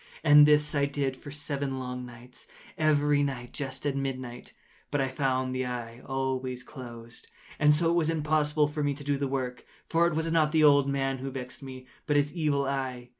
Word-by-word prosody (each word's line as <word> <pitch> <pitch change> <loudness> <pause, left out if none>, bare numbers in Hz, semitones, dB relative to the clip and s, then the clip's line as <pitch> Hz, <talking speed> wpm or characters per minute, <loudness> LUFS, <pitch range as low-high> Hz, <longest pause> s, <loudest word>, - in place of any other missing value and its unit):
And 150 -1 +8
this 150 0 +3
I 140 -1 +2
did 140 -2 -2
for 145 - -11
seven 140 -2 -3
long 125 -1 -5
nights—every 145 +4 -1
night 130 -4 -3
just 140 +1 -5
at 140 -1 0
midnight—but 130 +1 -6
I 135 - +1
found 130 -1 -1
the 130 0 -2
eye 120 -1 -6
always 130 -1 -2
closed; 120 -4 -11 0.3
and 150 0 +5
so 165 +2 +2
it - - +2
was 165 -2 +2
impossible 150 -1 +1
to 145 -1 -1
do 145 0 0
the 140 - 0
work; 130 -2 -3 0.2
for 170 +1 +3
it 170 - -2
was 160 +1 -1
not 155 -2 +3
the 160 -1 +4
old 140 -2 +5
man 135 -1 -1
who 135 +1 -4
vexed 130 -1 -7
me, 130 -1 -9 0.2
but 150 - +3
his 145 0 +1
Evil 150 -5 0
Eye. 130 -3 -3
140 Hz, 185 wpm, -28 LUFS, 130-150 Hz, 0.3 s, And